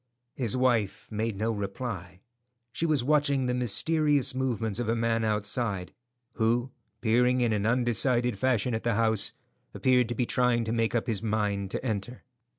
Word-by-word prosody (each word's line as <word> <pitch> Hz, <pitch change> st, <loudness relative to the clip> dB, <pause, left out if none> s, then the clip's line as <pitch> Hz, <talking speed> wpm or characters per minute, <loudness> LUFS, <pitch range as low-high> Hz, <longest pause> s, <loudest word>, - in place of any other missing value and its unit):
His 125 Hz, -2 st, 0 dB
wife 120 Hz, -6 st, 0 dB
made 110 Hz, -1 st, -2 dB
no 110 Hz, +3 st, 0 dB
reply. 100 Hz, -3 st, -5 dB, 0.5 s
She 165 Hz, -, -1 dB
was 150 Hz, -6 st, +2 dB
watching 140 Hz, -1 st, +2 dB
the 125 Hz, -, 0 dB
mysterious 145 Hz, +3 st, +1 dB
movements 120 Hz, -5 st, -2 dB
of 120 Hz, -2 st, -2 dB
a 115 Hz, -, +2 dB
man 115 Hz, 0 st, 0 dB
outside, 105 Hz, -2 st, -1 dB, 0.4 s
who, 120 Hz, +2 st, 0 dB, 0.3 s
peering 125 Hz, +2 st, +3 dB
in 120 Hz, -2 st, +2 dB
an 105 Hz, 0 st, 0 dB
undecided 120 Hz, -1 st, +1 dB
fashion 125 Hz, -2 st, +1 dB
at 110 Hz, -, -1 dB
the 115 Hz, -2 st, 0 dB
house, 110 Hz, -2 st, +3 dB, 0.4 s
appeared 125 Hz, -2 st, +2 dB
to 120 Hz, -, -2 dB
be 125 Hz, -, 0 dB
trying 125 Hz, -1 st, +1 dB
to 110 Hz, -, -3 dB
make 115 Hz, 0 st, 0 dB
up 115 Hz, -, 0 dB
his 110 Hz, -5 st, -2 dB
mind 105 Hz, -3 st, -1 dB
to 115 Hz, -, -5 dB
enter. 110 Hz, +1 st, -4 dB
115 Hz, 165 wpm, -28 LUFS, 110-125 Hz, 0.5 s, peering